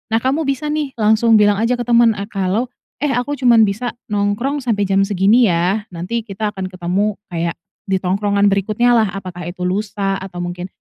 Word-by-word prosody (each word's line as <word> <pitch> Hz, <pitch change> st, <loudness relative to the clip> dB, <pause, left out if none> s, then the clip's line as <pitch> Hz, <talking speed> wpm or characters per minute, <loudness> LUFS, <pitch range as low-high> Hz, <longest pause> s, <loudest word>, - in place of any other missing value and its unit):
Nah, -, -, +3 dB
kamu 275 Hz, +4 st, 0 dB
bisa 290 Hz, +2 st, -1 dB
nih, 300 Hz, -3 st, -3 dB
langsung 220 Hz, +1 st, +3 dB
bilang 205 Hz, -1 st, +4 dB
aja 230 Hz, +3 st, +1 dB
ke 245 Hz, -, -3 dB
temen 235 Hz, -1 st, +4 dB
ah 200 Hz, 0 st, -4 dB
kalau, 205 Hz, +4 st, -1 dB, 0.3 s
"Eh, 295 Hz, -, +1 dB
aku 250 Hz, +3 st, -1 dB
cuma 245 Hz, -4 st, +4 dB
bisa 220 Hz, +3 st, +1 dB, 0.2 s
nongkrong 210 Hz, +7 st, -1 dB
sampai 220 Hz, -5 st, 0 dB
jam 195 Hz, 0 st, +3 dB
segini 205 Hz, +4 st, +3 dB
ya, 180 Hz, +5 st, 0 dB
nanti, 180 Hz, +7 st, -4 dB
kita 210 Hz, 0 st, -4 dB
akan 185 Hz, -1 st, -5 dB
ketemu, 185 Hz, +3 st, -1 dB
kayak, 170 Hz, -1 st, -2 dB, 0.3 s
di 195 Hz, -, +1 dB
tongkrongan 200 Hz, +2 st, +1 dB
berikutnya, 215 Hz, +5 st, +1 dB
lah." 220 Hz, -2 st, +3 dB
apakah 180 Hz, -3 st, -7 dB
itu 180 Hz, +1 st, -8 dB
lusa, 195 Hz, +1 st, -1 dB
atau 180 Hz, -2 st, -7 dB
mungkin 175 Hz, +1 st, -5 dB
205 Hz, 190 wpm, -18 LUFS, 190-235 Hz, 0.3 s, bilang